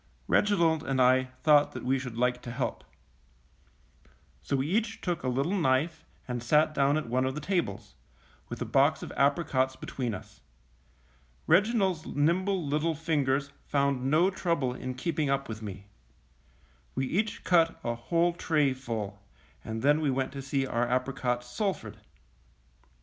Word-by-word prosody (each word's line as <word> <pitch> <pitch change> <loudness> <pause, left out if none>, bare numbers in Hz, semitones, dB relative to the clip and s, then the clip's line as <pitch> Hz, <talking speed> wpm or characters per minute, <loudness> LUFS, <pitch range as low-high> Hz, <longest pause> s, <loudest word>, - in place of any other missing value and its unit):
Reginald 170 -7 +3
and 135 -4 -2
I 130 +1 +5 0.2
thought 150 -2 +5
that - - -7
we 130 +1 +2
should 125 -3 -7
like 125 0 +1
to 120 - -7
help. 125 +2 -3 1.6
So 140 - -2
we 135 0 0
each 220 +6 -1
took 175 -2 -2
a - - -3
little 135 +9 0
knife 155 -1 0 0.2
and 125 -1 -3
sat 150 +5 +3
down 140 0 +2
at 155 - -2
one 125 +2 +1
of 130 +1 -1
the - - -3
tables, 175 +3 -2 0.6
with - - -6
a - - -6
box - - +2
of - - -7
apricots 140 -2 +1
between 125 -4 -4
us. - - -12 1.0
Reginald's 195 -6 +3
nimble 175 +4 +1
little 155 +3 0
fingers 140 -3 0 0.2
found 140 -2 +1
no 170 +6 +4
trouble 165 -9 -1
in 130 0 -5
keeping 150 +1 -1
up 135 0 0
with 110 -1 -6
me. 100 -2 -7 1.1
We 135 - 0
each 210 +10 -1
cut 165 -2 +3
a 120 - -1
whole 170 +9 +1
tray 150 -5 +1
full, 110 -6 -5 0.4
and 110 +1 -5
then 145 +2 +4
we 150 - +1
went 130 0 -1
to 140 0 -6
see 135 0 -1
our 120 -1 0
apricots 125 -1 -1
sulphured. 195 - -3
140 Hz, 155 wpm, -29 LUFS, 130-165 Hz, 1.6 s, I